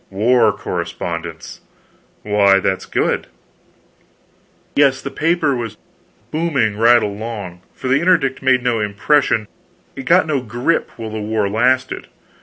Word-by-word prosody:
"War 115 +6 +3
correspondence!" 85 -1 -5 0.6
"Why, 100 -2 +4
that's 95 0 -2
good." - - -1 1.5
"Yes, 140 -2 +3
the 140 - -6
paper 160 -3 +1
was 115 -3 -5 0.5
booming 145 -10 0
right 115 +2 +5
along, 105 -4 -5
for 130 - -6
the 130 +2 +3
Interdict 165 -6 +2
made 130 -2 +2
no 120 -2 +1
impression, 110 +2 +1 0.6
got 175 +7 +4
no 145 -4 -1
grip, 120 +7 -1
while 110 -2 -6
the 110 - -4
war 105 -1 -1
lasted. 125 +5 0
120 Hz, 120 wpm, -18 LUFS, 105-135 Hz, 1.5 s, right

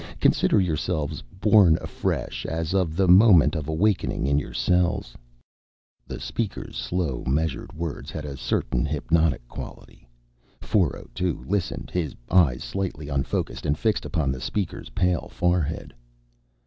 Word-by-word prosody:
Consider - - +3
yourselves 80 -4 -1 0.2
born 100 -6 +6
afresh - - -3
as 80 +1 -2
of 90 -5 +1
the 95 +1 +2
moment 90 -5 +7
of 75 -2 -3
awakening 85 0 +1
in 70 +1 +3
your - - -7
cells." 85 0 +1 0.9
The - - -6
speaker's 110 -4 -4
slow, 85 -8 -2
measured 75 +2 -1
words 80 0 -5
had 75 - -6
a 70 -2 -5
certain 65 -1 -1
hypnotic 75 -2 +1
quality. - - -10 0.5
402 80 +2 -1
listened, 100 -3 -2
his 80 -6 -2 0.2
eyes 80 -10 +4
slightly 90 -7 -4
unfocused 70 -1 -2
and 75 +1 +1
fixed 110 +3 0
upon 80 -6 -1
the 65 -1 -5
speaker's 95 +6 -3
pale 90 -1 0
forehead. 90 -3 -1
80 Hz, 130 wpm, -25 LUFS, 70-90 Hz, 0.9 s, moment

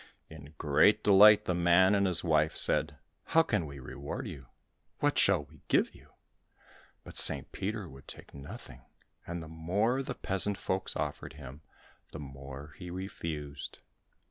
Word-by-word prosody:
In 75 0 -12
great 100 +9 +3
delight 105 +1 +7
the 90 - 0
man 90 +3 +4
and 100 -1 +2
his 90 -3 +1
wife 80 -2 +2
said, 75 -1 +3 0.3
"How 165 +2 +3
can 105 - -1
we 70 0 -10
reward 70 +2 -7
you? 65 -3 -9 0.5
What - - +1
shall 75 - +3
we 75 0 -20
give - - +2
you?" - - -18 0.9
But - - -9
St. - - +4
Peter 105 0 -4
would 70 -2 -14
take - - -11
nothing, 70 0 -10 0.5
and 85 -1 -5
the - - -10
more 95 +11 -1
the 135 - -5
peasant 95 +1 -2
folks 95 +1 -2
offered - - -4
him, 65 +4 -11 0.5
the 80 - -7
more 70 +1 -10
he 90 -2 -8
refused. 85 -6 -6
80 Hz, 155 wpm, -30 LUFS, 70-95 Hz, 0.9 s, delight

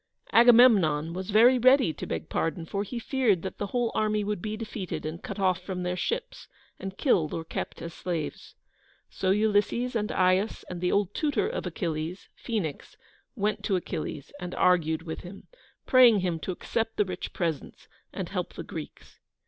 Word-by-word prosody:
Agamemnon 220 -10 +6
was 185 +2 -5
very 235 +5 +6
ready 255 - +5
to - - -7
beg - - -4
pardon, 165 0 -2
for 200 +4 -3
he 210 +4 -5
feared 235 - +1
that 190 - -6
the 205 - -2
whole 240 +1 0
army 215 -1 +1
would 205 -2 -2
be 215 0 -4
defeated, 210 -7 -5
and 155 +2 -5
cut - - -6
off 185 -2 +1
from 180 -1 -4
their 180 0 -1
ships, 180 - -3 0.3
and 195 0 -6
killed 165 - +2
or 165 - -4
kept - - -5
as 165 0 -6
slaves. 170 -4 -5 0.6
So 185 - -1
Ulysses 215 +4 +1
and 210 -2 -1
Aias 185 +3 +1
and 175 -1 -6
the 180 - +1
old 200 -1 +1
tutor 290 -8 0
of - - -3
Achilles, 165 +1 -4
Phoenix, 200 - -4 0.4
went 210 -2 -1
to 200 - +1
Achilles 155 -5 -4
and 180 -1 -6
argued 165 -3 +2
with 160 -1 -5
him, 185 +2 -11 0.4
praying 245 -6 +6
him 175 -3 -1
to 170 - -4
accept 225 +5 -3
the 210 - +3
rich 180 -1 -5
presents, 165 -5 -4 0.2
and - - -4
help - - -4
the - - -6
Greeks. - - -9
190 Hz, 180 wpm, -27 LUFS, 175-220 Hz, 0.6 s, Agamemnon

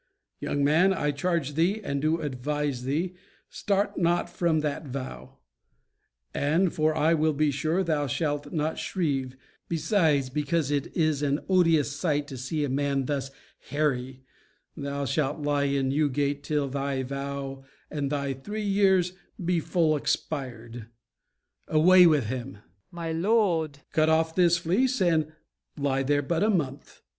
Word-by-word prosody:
Young 145 - -1
man, 165 +7 +4
I 150 -3 0
charge 150 0 -1
thee 175 +8 +1
And 140 -6 -2
do 160 +2 +1
advise 145 -1 -2
thee, 165 +7 -1 0.4
start 200 0 -1
not 175 0 +1
from 170 -3 +1
that 150 0 -3
vow: 130 - -7 1.0
And, 165 +5 +1
for 155 0 +1
I 160 +2 +3
will 155 -1 +2
be 150 +1 +2
sure 155 +7 0
thou 150 -4 0
shalt 145 +2 -2
not 155 -1 -1
shrieve, 135 -8 -2 0.3
Besides, 160 -5 +1
because 150 +1 0
it 145 -2 0
is 155 -4 +2
an 145 0 0
odious 165 -6 +3
sight 145 -1 0
To 135 - -7
see 150 +4 -2
a - - 0
man 140 0 0
thus 135 -1 -2 0.4
hairy, 135 -3 -1 0.5
thou 140 -1 -3
shalt 145 +2 -1
lie 145 -1 +1
In 140 -1 0
Newgate 145 0 0
till 145 -1 -1
thy 135 0 -2
vow 140 0 -5 0.3
and 145 -2 -2
thy 140 -2 -1
three 210 +11 -5
years 190 -3 +3 0.3
Be 175 -1 +2
full 160 -1 +1
expired. 120 -6 -3 0.8
Away 180 +3 +6
with 150 -7 +3
him! 130 +3 -4
FAULKNER. 105 - -20 0.3
My 170 -1 -5
lord 165 -5 +1
MORE. 140 - -26
Cut 155 0 +3
off 160 0 +2
this 175 -1 +4
fleece, 220 +10 +1
and 160 -4 +2 0.5
lie 135 -1 0
there 145 +1 +1
but 165 +4 -1
a 210 - +3
month. 145 -9 -2
150 Hz, 150 wpm, -27 LUFS, 140-165 Hz, 1.0 s, Away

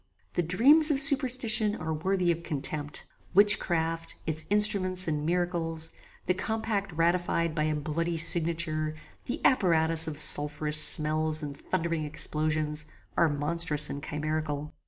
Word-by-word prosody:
The - - -1
dreams 270 - +4
of 285 -3 +2
superstition 255 -6 +3
are 160 -5 -5
worthy 180 +2 -1
of 170 0 -4
contempt. 150 -2 -4 0.3
Witchcraft, 165 -5 +2
its 155 0 -3
instruments 195 -3 +2
and 150 -1 -3
miracles, 170 -2 -2 0.3
the 180 - 0
compact 210 0 -4
ratified 170 0 -1
by 155 0 -2
a 155 0 -1
bloody 165 +3 -3
signature, 160 -2 -1 0.3
the 255 +5 -4
apparatus 165 - +2
of 155 -2 -6
sulpherous 150 0 +3
smells 155 0 +4
and 145 -1 -7
thundering 165 +2 -4
explosions, 155 0 -2 0.3
are 170 - +2
monstrous 150 0 +1
and 140 - -7
chimerical. 150 -1 -5
165 Hz, 130 wpm, -27 LUFS, 155-185 Hz, 0.3 s, dreams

